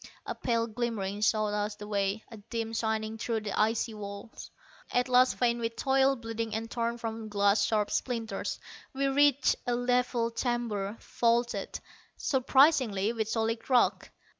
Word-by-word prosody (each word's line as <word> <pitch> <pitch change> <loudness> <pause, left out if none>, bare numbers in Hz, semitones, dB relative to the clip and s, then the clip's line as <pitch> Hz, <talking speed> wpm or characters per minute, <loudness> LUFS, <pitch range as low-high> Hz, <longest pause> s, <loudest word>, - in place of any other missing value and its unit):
A - - -3
pale 230 -2 0
glimmering 215 -3 -3
showed 215 -1 +2
us 210 0 -1
the 210 0 -9
way, 200 +1 -1
a 225 - -9
dim 225 +2 -5
shining 220 0 -2
through 225 -1 -1
the 210 -1 -4
icy 220 +2 +1
walls. 200 +1 -8 0.4
At 250 +1 +2
last, 255 0 +4
faint 240 -1 +2
with 230 0 -3
toil, 270 0 +3
bleeding 225 -2 -4
and 225 +1 -4
torn 235 0 -1
from 225 -1 -5
glass 200 0 +3
sharp 210 -2 +1
splinters, 230 -3 -2 0.3
we 275 +1 0
reached 285 0 +3
a 245 - +2
level 245 -1 +1
chamber, 230 -4 -2
vaulted, 235 0 0 0.4
surprisingly, 260 -6 +3
with 220 -2 -2
solid 225 +1 -1
rock. 250 -2 +3
230 Hz, 150 wpm, -29 LUFS, 215-245 Hz, 0.4 s, last